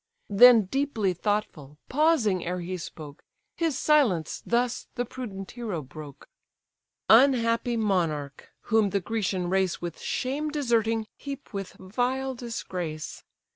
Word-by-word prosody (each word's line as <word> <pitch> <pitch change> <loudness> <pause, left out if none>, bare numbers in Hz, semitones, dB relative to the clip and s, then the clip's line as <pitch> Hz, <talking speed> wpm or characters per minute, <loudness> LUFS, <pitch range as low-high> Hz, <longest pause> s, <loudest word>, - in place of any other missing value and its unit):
Then 230 +2 +8
deeply 225 -4 0
thoughtful, 175 -7 -3
pausing 265 - +2
ere 180 +1 -3
he 180 +2 -4
spoke, 155 -4 -9 0.3
His 325 -5 0
silence 265 - +2
thus 240 +1 0
the 245 - -1
prudent 205 -6 -7
hero 215 -10 -4
broke: 145 +1 -11 0.8
"Unhappy 235 -1 +4
monarch! 165 -10 -1
whom 220 -3 +2
the 200 - 0
Grecian 190 -2 -2
race 190 0 +1
With 175 -2 -6
shame 285 +4 -2
deserting, 230 -6 +1
heap 280 -3 -8
with 195 -2 -5
vile 250 +7 -2
disgrace. 180 -10 -5
215 Hz, 120 wpm, -27 LUFS, 180-250 Hz, 0.8 s, Then